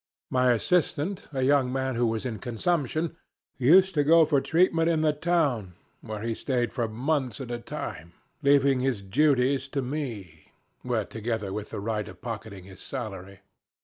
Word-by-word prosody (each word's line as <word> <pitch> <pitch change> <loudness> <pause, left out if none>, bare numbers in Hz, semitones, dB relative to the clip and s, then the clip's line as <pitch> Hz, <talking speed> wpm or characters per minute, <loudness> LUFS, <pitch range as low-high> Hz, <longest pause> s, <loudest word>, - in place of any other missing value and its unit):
My 125 -1 +4
assistant, 170 - 0
a 135 -3 -1
young 135 -1 +3
man 130 0 -1
who 120 0 +1
was 110 +2 -2
in 115 -4 -4
consumption, 155 +6 -1 0.4
used 185 +9 +6
to 145 -3 +2
go 165 +2 +6
for 145 -3 +2
treatment 165 0 +2
to 165 - +2
the 155 -1 +2
town, 145 - 0 0.3
where 110 -1 -6
he 115 0 -1
stayed 120 -2 -1
for 120 -3 -1
months 130 +4 -1
at 130 -3 -6
a 120 - -3
time, 85 -7 -7 0.3
leaving 140 -2 +4
his 125 -6 -1
duties 135 +4 +2
to 135 0 -2
me 115 - -6 0.6
together 110 -3 -3
with 105 0 -5
the - - -5
right 105 0 -2
of - - -11
pocketing 110 -5 -7
his 95 0 -13
salary. 100 -6 -6
130 Hz, 165 wpm, -27 LUFS, 110-145 Hz, 0.6 s, used